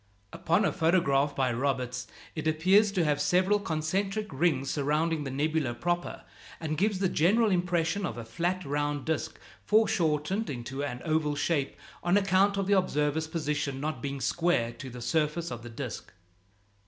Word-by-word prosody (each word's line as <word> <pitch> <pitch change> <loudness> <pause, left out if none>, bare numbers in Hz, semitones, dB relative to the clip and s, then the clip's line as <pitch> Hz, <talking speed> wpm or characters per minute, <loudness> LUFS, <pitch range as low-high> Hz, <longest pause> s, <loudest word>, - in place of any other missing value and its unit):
Upon 170 +6 +1
a - - +2
photograph 160 -5 +2
by 130 -3 +1
Roberts 125 -1 -2 0.3
it 155 -1 -3
appears 190 +7 +4
to 185 -4 +2
have 145 -1 +1
several 185 +6 +3
concentric 195 +5 -2
rings 135 -2 +1
surrounding 150 +2 0
the - - -3
nebula 145 -2 -1
proper, 175 +5 -2 0.4
and 155 -2 -2
gives 200 +5 +1
the 190 0 +1
general 205 +7 +3
impression 175 +1 0
of 120 -10 -3
a 115 - -6
flat 175 +9 -2
round 145 0 -1
disk 160 -1 -2 0.2
foreshortened 190 -2 +1
into 135 +1 -4
an 125 -3 -4
oval 155 -2 +1
shape 145 -2 0 0.3
on 175 +3 +3
account 195 0 +3
of 195 - 0
the 200 - +2
observer's 155 -4 +1
position 150 -4 -2
not 150 -3 -3
being 140 +1 -4
square 165 -6 +1
to 135 - -8
the 125 0 -9
surface 155 +6 0
of 120 -1 -5
the 120 - -9
disk. 115 - -6
155 Hz, 165 wpm, -29 LUFS, 140-180 Hz, 0.4 s, appears